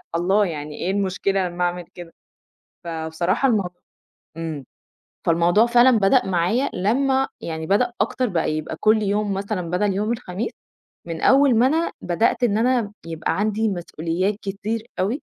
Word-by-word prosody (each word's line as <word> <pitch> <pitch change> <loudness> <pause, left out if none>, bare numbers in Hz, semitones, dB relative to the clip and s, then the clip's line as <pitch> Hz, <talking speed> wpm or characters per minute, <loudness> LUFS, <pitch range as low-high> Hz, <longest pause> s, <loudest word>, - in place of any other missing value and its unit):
الله 190 +5 +2
يعني 150 -3 -5
إيه 180 - -2
المشكلة 195 -1 0
لمّا 175 0 -3
أعمل 175 0 -2
كده، 175 -2 -10 0.7
فبصراحة 170 +8 -1
الم 215 -5 +2 0.7
امم، 160 -4 -5 0.6
فالموضوع 170 +6 +4
فعلًا 240 0 +5
بدأ 210 +6 +3
معايا 190 +9 +1
لمّا 265 +7 +1
يعني 160 -1 -5
بدأ 235 +7 +2
أكتر 255 -2 0
بقى 165 -4 0
يبقى 155 +1 -5
كُلّ 215 0 +4
يوم 205 0 0
مثلًا 195 -3 -3
بَدَل 200 +2 +1
يوم 210 +4 0
الخميس، 215 0 -4 0.6
من 165 -1 -5
أوّل 270 -2 +5
ما 245 +3 +5
أنا 325 +4 0
بدأت 220 +7 +1
إن 210 -3 +2
أنا 235 -2 +1
يبقى 165 +3 -2
عندي 215 +1 +1
مسئوليات 175 +1 -2
كتير 215 +3 -4
أوي، 220 +10 0
195 Hz, 150 wpm, -22 LUFS, 175-230 Hz, 0.7 s, فعلًا